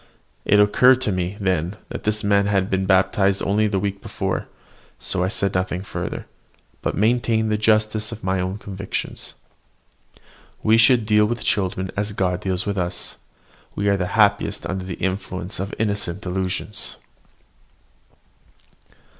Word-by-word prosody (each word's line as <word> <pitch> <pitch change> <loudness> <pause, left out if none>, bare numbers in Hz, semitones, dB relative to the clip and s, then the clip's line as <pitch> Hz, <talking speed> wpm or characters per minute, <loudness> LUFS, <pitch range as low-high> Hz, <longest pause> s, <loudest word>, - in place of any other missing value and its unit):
It 105 - +5
occurred 125 +5 +6
to 105 - +1
me 90 +1 -2
then, 95 -1 0
that - - -7
this 105 0 0
very 100 - 0
man 100 0 +4
had 100 -2 +1
been 95 0 0
baptised 95 +1 +3
only 105 +2 +2
a 100 - +1
week 100 0 -2
before; - - -3 0.5
so 90 -2 -1
I - - +1
said 100 0 0
nothing 90 0 -1
further, - - -5 0.6
but - - -2
maintained 110 0 +2
the 105 - +2
justice 110 0 +2
of 115 -1 -8
my 95 0 0
own 95 +2 -2
convictions. 95 -2 -5 1.3
We 110 +1 +5
should 115 0 +5
deal 105 0 +4
with 120 0 -3
children 95 -1 0
as 100 +1 -2
God 90 -2 0
deals 95 -1 -2
with 100 -1 -1
us, 90 0 -3 0.6
we 100 0 +1
are 100 - +3
happiest 100 +1 +2
under 95 0 -3
the 90 -2 -4
influence 95 0 -3
of 95 +1 -3
innocent 100 -4 -1
delusions. 95 +2 -2
100 Hz, 150 wpm, -22 LUFS, 95-105 Hz, 1.3 s, occurred